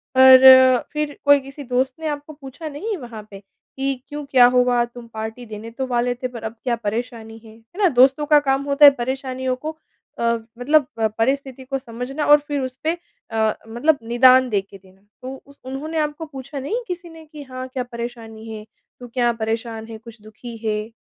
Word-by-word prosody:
पर 260 Hz, -1 st, +8 dB
फिर 300 Hz, -1 st, -3 dB
कोई 285 Hz, 0 st, +6 dB
किसी 275 Hz, +2 st, -10 dB
दोस्त 255 Hz, +1 st, 0 dB
ने 320 Hz, -, -4 dB
आपको 295 Hz, +1 st, -5 dB
पूछा 285 Hz, +2 st, -10 dB
नहीं 390 Hz, +9 st, -4 dB
वहाँ 235 Hz, -7 st, -9 dB
पे, 195 Hz, -, -10 dB
कि 270 Hz, +7 st, -6 dB
क्यों 295 Hz, +1 st, -6 dB
क्या 250 Hz, -2 st, +7 dB
हुआ 245 Hz, -1 st, +3 dB
तुम 240 Hz, 0 st, -13 dB
पार्टी 220 Hz, +2 st, -6 dB
देने 220 Hz, +1 st, -9 dB
तो 260 Hz, +2 st, -4 dB
वाले 245 Hz, 0 st, 0 dB
थे 255 Hz, +1 st, -4 dB
पर 235 Hz, -2 st, -10 dB
अब 220 Hz, +1 st, -5 dB
क्या 245 Hz, -2 st, 0 dB
परेशानी 225 Hz, 0 st, -5 dB
है, 220 Hz, 0 st, -14 dB
है 230 Hz, -, -10 dB
ना? 370 Hz, -, +6 dB
दोस्तों 270 Hz, +2 st, +4 dB
का 295 Hz, 0 st, +5 dB
काम 270 Hz, -1 st, 0 dB
होता 285 Hz, +1 st, +5 dB
है 285 Hz, -, +11 dB
परेशानियों 260 Hz, +1 st, -3 dB
को 310 Hz, +4 st, -7 dB, 0.4 s
अ, -, -, -2 dB, 0.4 s
मतलब 290 Hz, +2 st, +3 dB
अ, 220 Hz, -, +3 dB
परिस्थिति 260 Hz, +4 st, -2 dB
को 270 Hz, +1 st, -2 dB
समझना 255 Hz, +4 st, -5 dB
और 295 Hz, 0 st, +7 dB
फिर 290 Hz, -1 st, -2 dB
उसपे 260 Hz, +5 st, -3 dB, 0.4 s
अ, 220 Hz, -1 st, +1 dB
मतलब 260 Hz, +7 st, +1 dB
निदान 255 Hz, +2 st, +5 dB
देके 195 Hz, -1 st, -3 dB
देना। 190 Hz, 0 st, -23 dB, 0.2 s
तो 260 Hz, +1 st, -7 dB
उस 280 Hz, 0 st, -20 dB
उन्होंने 290 Hz, +5 st, -5 dB
आपको 300 Hz, +2 st, -3 dB
पूछा 275 Hz, -1 st, -8 dB
नहीं 455 Hz, -, -3 dB
किसी 355 Hz, -1 st, -6 dB
ने 325 Hz, -1 st, -13 dB
कि 300 Hz, -1 st, -11 dB
हाँ, 255 Hz, -1 st, -7 dB
क्या 255 Hz, -1 st, -4 dB
परेशानी 235 Hz, -2 st, -8 dB
है? 215 Hz, -1 st, -8 dB, 0.3 s
तू 245 Hz, -, -9 dB
क्या 240 Hz, -2 st, +2 dB
परेशान 225 Hz, 0 st, -4 dB
है 225 Hz, -, -8 dB
कुछ 230 Hz, 0 st, -15 dB
दुखी 225 Hz, +2 st, -11 dB
है? 215 Hz, +1 st, -2 dB
255 Hz, 195 wpm, -21 LUFS, 230-280 Hz, 0.4 s, है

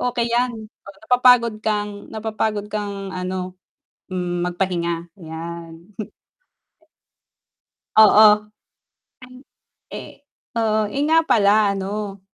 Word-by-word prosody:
okey 240 Hz, -1 st, -1 dB
yan, 245 Hz, +1 st, +1 dB, 0.3 s
napapagod 235 Hz, +3 st, +3 dB
kang 210 Hz, -1 st, 0 dB, 0.2 s
napapagod 215 Hz, -1 st, -2 dB
kang, 200 Hz, -2 st, -4 dB
ano, 185 Hz, 0 st, -5 dB, 0.6 s
mm, 175 Hz, -1 st, -2 dB
magpahinga 175 Hz, -2 st, -2 dB
yan. 165 Hz, -1 st, -8 dB, 2.2 s
Oo. 215 Hz, 0 st, +8 dB, 0.9 s
Ay, 255 Hz, 0 st, -14 dB, 0.6 s
eh, -, -, -8 dB, 0.4 s
oo, 220 Hz, -2 st, +1 dB
eh, 275 Hz, +7 st, -3 dB
nga 325 Hz, +1 st, +5 dB
pala, 205 Hz, -1 st, +4 dB
ano 200 Hz, 0 st, -5 dB
205 Hz, 85 wpm, -21 LUFS, 185-220 Hz, 2.2 s, Oo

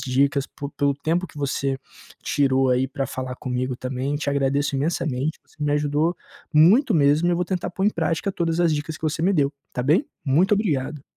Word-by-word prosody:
dicas, 140 Hz, +2 st, +1 dB
por 140 Hz, 0 st, -8 dB
pelo 140 Hz, 0 st, +1 dB
tempo 165 Hz, +6 st, -1 dB
que -, -, -19 dB
você 135 Hz, -1 st, -1 dB, 0.4 s
tirou, 135 Hz, -3 st, +2 dB
aí, 125 Hz, +1 st, +2 dB
pra 135 Hz, 0 st, -3 dB
falar 130 Hz, 0 st, -5 dB
comigo 125 Hz, 0 st, -3 dB
também. 130 Hz, +3 st, -3 dB
Te 145 Hz, -1 st, -2 dB
agradeço 140 Hz, +1 st, 0 dB
imensamente. 150 Hz, -1 st, -1 dB
Você -, -, -26 dB
me 145 Hz, -, +1 dB
ajudou 150 Hz, +3 st, +1 dB, 0.4 s
muito 205 Hz, -, +5 dB
mesmo 150 Hz, +3 st, +4 dB
e -, -, +3 dB
eu -, -, +1 dB
vou 180 Hz, -, 0 dB
tentar 180 Hz, -1 st, -3 dB
pôr 190 Hz, +2 st, -2 dB
em 210 Hz, -, +4 dB
prática 165 Hz, +3 st, -1 dB
todas 170 Hz, -1 st, -1 dB
as 170 Hz, -2 st, +3 dB
dicas 155 Hz, +2 st, -4 dB
que -, -, -21 dB
você 160 Hz, +1 st, -1 dB
me 195 Hz, +3 st, +3 dB
deu, 145 Hz, -4 st, +2 dB, 0.2 s
está 125 Hz, -, -3 dB
bem? 165 Hz, -, +3 dB, 0.2 s
Muito 170 Hz, +9 st, +3 dB
obrigado. 150 Hz, -8 st, -1 dB
145 Hz, 205 wpm, -23 LUFS, 135-165 Hz, 0.4 s, muito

